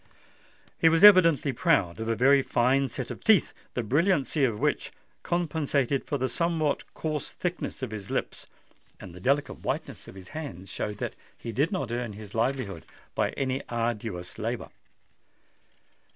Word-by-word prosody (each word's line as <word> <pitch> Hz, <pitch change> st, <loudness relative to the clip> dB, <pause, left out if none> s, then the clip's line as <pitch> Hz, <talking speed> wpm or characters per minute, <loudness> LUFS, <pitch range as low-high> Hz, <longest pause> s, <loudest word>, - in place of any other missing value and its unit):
He 165 Hz, -, +6 dB
was 165 Hz, +3 st, +2 dB
evidently 165 Hz, -9 st, +7 dB
proud 90 Hz, -5 st, +2 dB
of 110 Hz, -, -3 dB
a 115 Hz, -, +1 dB
very 135 Hz, +5 st, +5 dB
fine 130 Hz, +2 st, +2 dB
set -, -, -5 dB
of -, -, -8 dB
teeth, -, -, +4 dB, 0.2 s
the 120 Hz, -, -1 dB
brilliancy 150 Hz, -, +2 dB
of 115 Hz, -5 st, +1 dB
which -, -, 0 dB, 0.3 s
compensated 150 Hz, -6 st, 0 dB
for 145 Hz, -, -1 dB
the 130 Hz, 0 st, 0 dB
somewhat 160 Hz, +1 st, -1 dB
coarse 155 Hz, -2 st, -3 dB
thickness 175 Hz, -6 st, -4 dB
of 125 Hz, -, -3 dB
his 100 Hz, -3 st, -7 dB
lips; -, -, -3 dB, 0.5 s
and 90 Hz, -, -10 dB
the 90 Hz, -, -10 dB
delicate 140 Hz, +7 st, 0 dB
whiteness -, -, -4 dB
of -, -, -11 dB
his 95 Hz, -2 st, -11 dB
hands 100 Hz, -, -7 dB
showed 105 Hz, -1 st, -4 dB
that -, -, -3 dB, 0.2 s
he 115 Hz, -, -6 dB
did 140 Hz, +9 st, +1 dB
not 155 Hz, -, -2 dB
earn 120 Hz, -2 st, -3 dB
his 105 Hz, -1 st, -10 dB
livelihood 115 Hz, -7 st, -1 dB, 0.3 s
by -, -, +1 dB
any 130 Hz, 0 st, -1 dB
arduous 115 Hz, -6 st, -3 dB
labour. -, -, -3 dB
130 Hz, 160 wpm, -27 LUFS, 110-150 Hz, 0.5 s, evidently